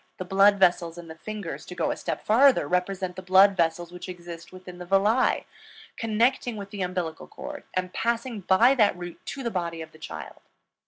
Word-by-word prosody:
The 185 - -5
blood 195 +2 +5
vessels 175 -3 +2
in 170 -1 -10
the - - -7
fingers, 205 0 -6
to 180 - -8
go - - 0
a - - -2
step - - -5
farther, 250 - +5
represent 180 +1 -1
the 185 - -6
blood 190 +2 +6
vessels 170 0 0
which 180 +1 -8
exist 170 -2 -9
within 185 -1 -11
the 180 - -7
villi, 205 +6 +2 0.5
connecting 230 +2 +1
with 200 -1 -8
the 205 - -5
umbilical 180 -3 -3
cord, 290 +1 -8
and 185 0 -2
passing 235 0 -1
by 195 +7 +5
that 215 -8 +3
route 175 -1 -8
to 275 - -5
the 235 - -2
body 170 -3 -3
of 160 -1 -8
the 155 - -18
child. - - -8
185 Hz, 200 wpm, -26 LUFS, 175-215 Hz, 0.5 s, blood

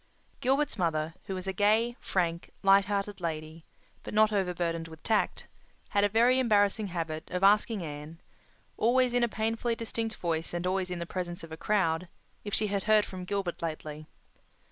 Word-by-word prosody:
Gilbert's 270 -2 +1
mother, 160 -2 0
who 190 - -4
was 185 0 -5
a 190 - -2
gay, 220 +5 +3
frank, 170 -2 -1
light 195 0 +6
hearted 200 -1 -2
lady, 160 -1 -4 0.4
but - - -7
not 215 0 +5
overburdened 175 -4 -1
with 160 -1 -13
tact, 220 -2 0 0.4
had 200 - +2
a 205 - +4
very 240 +4 +4
embarrassing 210 -3 +3
habit 165 -3 -4
of 180 +1 -2
asking 210 0 +4
Anne, 150 +1 -7 0.6
always 245 +2 +3
in 245 0 +3
a - - +4
painfully 225 +2 -1
distinct 225 -1 -3
voice 165 0 -2
and 175 +1 -2
always 185 0 0
in 180 - -3
the 170 - -4
presence 175 -1 -4
of 165 - -10
a - - -4
crowd, 180 -3 +1 0.4
if 205 - -5
she 215 - +2
had 200 -1 -2
heard 215 -1 +5
from 185 -1 -7
Gilbert 195 -2 -2
lately. 155 -2 -5
195 Hz, 180 wpm, -29 LUFS, 165-215 Hz, 0.6 s, light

